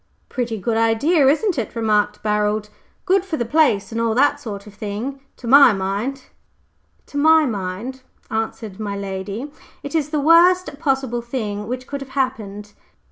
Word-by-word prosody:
"Pretty 240 -4 -2
good 225 +3 -1
idea, 265 +7 +3
isn't 320 - +2
it?" 230 - -5
remarked 210 -2 +1
Barold. 210 0 0 0.4
"Good 385 -1 +3
for 365 -5 -3
the 235 - -1
place 235 -7 +2
and 230 0 -2
all 230 -1 +1
that 285 +3 +3
sort 200 -5 -7
of 210 - -13
thing." 215 +7 -5 0.2
"To - - -11
my 270 -1 +8
mind," 205 +8 -3 2.1
answered 220 -2 -4
my 200 -2 -3
lady, 200 +7 -5 0.3
"it 285 - -6
is 305 -3 0
the 300 -1 -1
worst 335 +1 +4
possible 265 -5 0
thing 215 -4 -4
which 255 +2 -4
could 280 +1 -6
have 270 - -8
happened." 210 -6 -3
230 Hz, 150 wpm, -21 LUFS, 210-280 Hz, 2.1 s, my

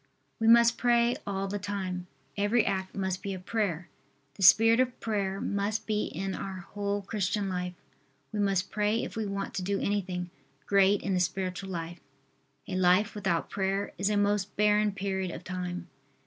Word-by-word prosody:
We 225 - +1
must 235 +1 +6
pray 240 0 +3
all 195 -1 -2
the 205 +1 -3
time. 190 -3 -4 0.3
Every 210 +3 +2
act 190 -1 -2
must 190 -1 -2
be 200 -1 -3
a - - -7
prayer. 185 -4 -2 0.5
The 195 - -12
spirit 225 +5 +7
of 255 -1 +1
prayer 200 -3 -1
must 205 +2 -1
be 210 -1 0
in 190 +3 -4
our 190 -2 -5
whole 205 +2 -3
Christian 200 0 -1
life. 180 -1 -3 0.6
We 215 - -3
must 195 -2 +1
pray 210 +2 +1
if - - -6
we 220 -2 -2
want 200 0 -4
to - - -2
do 195 +2 -1
anything 185 -3 -2 0.3
great 200 0 +4
in 195 - 0
the 185 - +2
spiritual 185 +1 -2
life. 170 -1 -5 0.7
A 190 - -3
life 185 +3 +3
without 190 -5 -1
prayer 195 +1 -1
is 195 +2 +1
a 210 - +1
most 205 -1 +1
barren 210 0 +3
period 190 -1 -2
of - - -7
time. 180 -1 -4
195 Hz, 175 wpm, -29 LUFS, 185-210 Hz, 0.7 s, spirit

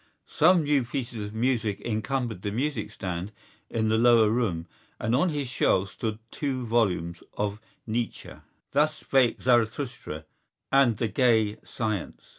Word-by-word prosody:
Some 170 +2 +4
new 145 -3 +2
pieces 120 -4 -4
of 105 - -10
music 115 -4 0
encumbered 115 -2 -2
the 100 - -2
music 140 +8 -2
stand 90 +1 -5 0.4
in 110 -1 0
the 110 +1 +2
lower 115 -2 +6
room 100 -9 0 0.3
and 115 +2 +1
on 175 +8 +3
his 145 -4 -2
shelves 100 -6 +1
stood 110 -2 -3
two 130 -4 -2
volumes 90 -7 0 0.2
by 105 0 -1 0.3
Nietzsche: 115 +1 -3 0.4
Thus 150 +2 +2
Spake 130 -5 +2
Zarathustra 120 - 0 0.5
and 135 -5 +4
The 115 - 0
Gay 110 -4 +2
Science. 110 -6 -4
115 Hz, 140 wpm, -27 LUFS, 105-130 Hz, 0.5 s, lower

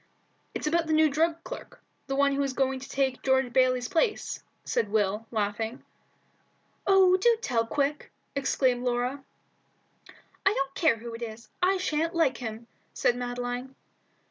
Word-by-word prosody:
"It's - - -3
about 330 +2 +1
the 315 - +1
new 310 -1 +5
drug 325 +3 +1
clerk, - - -9 0.3
the 270 - -1
one 280 0 +3
who 280 - 0
is 275 -1 -1
going 265 0 0
to 270 - -10
take 265 -2 0
George 265 -2 +2
Bayley's 255 -1 +3
place," 420 +6 0 0.2
said 210 - 0
Will, 210 +1 0
laughing. 220 +2 -2 1.0
"Oh, 380 -1 +6
do 465 +4 +4
tell, 230 - 0
quick!" 290 +3 -1 0.2
exclaimed 260 -2 +1
Laura. 250 +3 -1 1.2
"I 385 - +4
don't 275 0 -1
care 320 -8 +3
who 230 +1 -8
it 230 - -8
is. 230 0 -7
I 380 +2 +3
sha'n't 330 -1 -1
like 315 -6 +2
him," 225 -1 -6 0.3
said 240 - +2
Madeline. 245 +1 -4
265 Hz, 155 wpm, -28 LUFS, 245-315 Hz, 1.2 s, Oh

